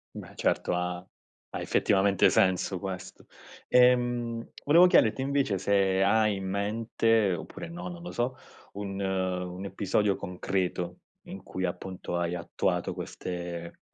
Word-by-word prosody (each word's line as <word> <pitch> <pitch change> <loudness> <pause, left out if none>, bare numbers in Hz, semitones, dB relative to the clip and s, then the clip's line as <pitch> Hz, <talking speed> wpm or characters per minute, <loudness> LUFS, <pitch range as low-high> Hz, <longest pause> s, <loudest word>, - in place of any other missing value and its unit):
Beh - - -9
certo, - - 0
ha 90 0 -2 0.5
ha - - -2
effettivamente 100 -1 +3
senso 95 0 +2
queso. 95 -1 -7 0.4
Ehm, 120 -2 +3
volevo 170 +5 +7
chiederti 125 -9 +4
invece 135 -7 +1
se 95 0 +2
hai 105 +1 +3
in 95 0 -5
mente 110 +1 +1
oppure 85 - -7
no, 175 +1 -6
non 175 -1 -8
lo 175 - -6
so, 125 +2 -2 0.4
un 100 -1 -5
un 95 -1 -2
episodio 100 +1 0
concreto 90 -1 -3 0.3
in 95 - -8
cui 95 -1 -5
appunto, 90 0 -5
hai 85 0 -1
attuato 85 - -1
queste 85 -1 -6
95 Hz, 130 wpm, -28 LUFS, 90-115 Hz, 0.5 s, volevo